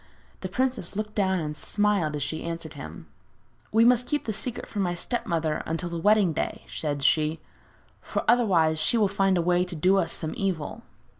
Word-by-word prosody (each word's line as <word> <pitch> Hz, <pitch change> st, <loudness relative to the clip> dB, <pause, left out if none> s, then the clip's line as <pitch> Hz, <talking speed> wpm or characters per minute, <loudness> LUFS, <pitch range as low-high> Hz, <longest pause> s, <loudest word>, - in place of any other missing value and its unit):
The 185 Hz, -, -5 dB
princess 250 Hz, -4 st, -1 dB
looked 215 Hz, 0 st, -3 dB
down 190 Hz, -3 st, +1 dB
and 150 Hz, -2 st, -4 dB
smiled 200 Hz, -3 st, 0 dB
as 145 Hz, -, -2 dB
she 160 Hz, +3 st, -3 dB
answered 165 Hz, -2 st, -5 dB
him: 80 Hz, +1 st, -9 dB, 0.7 s
'We 225 Hz, +2 st, +5 dB
must 250 Hz, 0 st, +4 dB
keep 295 Hz, -1 st, -1 dB
the 220 Hz, -, -2 dB
secret 230 Hz, +3 st, -3 dB
from 205 Hz, -, -4 dB
my 175 Hz, -2 st, 0 dB
step 240 Hz, +7 st, -2 dB
mother 160 Hz, -2 st, 0 dB
until 165 Hz, +2 st, -2 dB
the 170 Hz, -1 st, -4 dB
wedding 205 Hz, -2 st, +4 dB
day,' -, -, -3 dB
said 145 Hz, -3 st, -3 dB
she, 155 Hz, +2 st, +2 dB, 0.6 s
'for -, -, -3 dB
otherwise 175 Hz, -10 st, +3 dB
she 195 Hz, +9 st, +3 dB
will 210 Hz, -2 st, +4 dB
find 195 Hz, -1 st, +2 dB
a 170 Hz, -, +1 dB
way 175 Hz, +1 st, +3 dB
to 180 Hz, -1 st, -7 dB
do 185 Hz, +5 st, +3 dB
us 180 Hz, -4 st, +1 dB
some 160 Hz, -1 st, -4 dB
evil.' 185 Hz, -6 st, -2 dB
180 Hz, 200 wpm, -26 LUFS, 160-210 Hz, 0.7 s, We